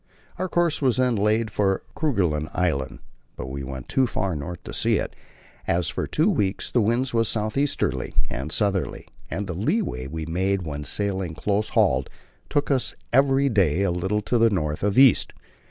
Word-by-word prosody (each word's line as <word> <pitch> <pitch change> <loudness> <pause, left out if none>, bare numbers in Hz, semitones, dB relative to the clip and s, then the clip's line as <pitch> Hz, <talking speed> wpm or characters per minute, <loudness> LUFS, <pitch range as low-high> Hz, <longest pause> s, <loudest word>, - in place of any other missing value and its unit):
Our 185 0 -1
course 170 -3 +1
was 130 -3 +2
then 125 -2 +2
laid 110 +2 +1
for 95 -2 +1
Kerguelen 90 - 0
Island, 70 -8 -1 0.3
but 65 - -6
we 70 0 -5
went 65 -1 -7
too 130 -1 +2
far 95 -6 -2
north 80 +4 -6
to - - -8
see - - +2
it, - - -2 0.5
as 85 0 +1
for - - -3
two 160 +5 +1
weeks 105 - 0
the 120 - +3
wind 120 +5 +1
was 115 -1 +2
south 110 -1 -1
easterly 140 +1 -1
and 70 +5 -5
southerly, 100 0 -1 0.2
and 100 - -3
the 90 - -4
leeway 105 - -1
we 80 +2 -5
made 95 +3 0
when 75 -2 -5
sailing 95 -2 -2
close 105 +4 0
hauled 65 +1 +3 0.4
took 145 0 0
us 130 -3 0 0.2
every 135 +1 +4
day 95 - +2
a 100 - +1
little 95 +5 -1
to 120 +3 +1
the 115 0 +5
north 75 -7 -1
of 100 +1 +1
east. 135 -2 +5
100 Hz, 185 wpm, -24 LUFS, 80-120 Hz, 0.5 s, the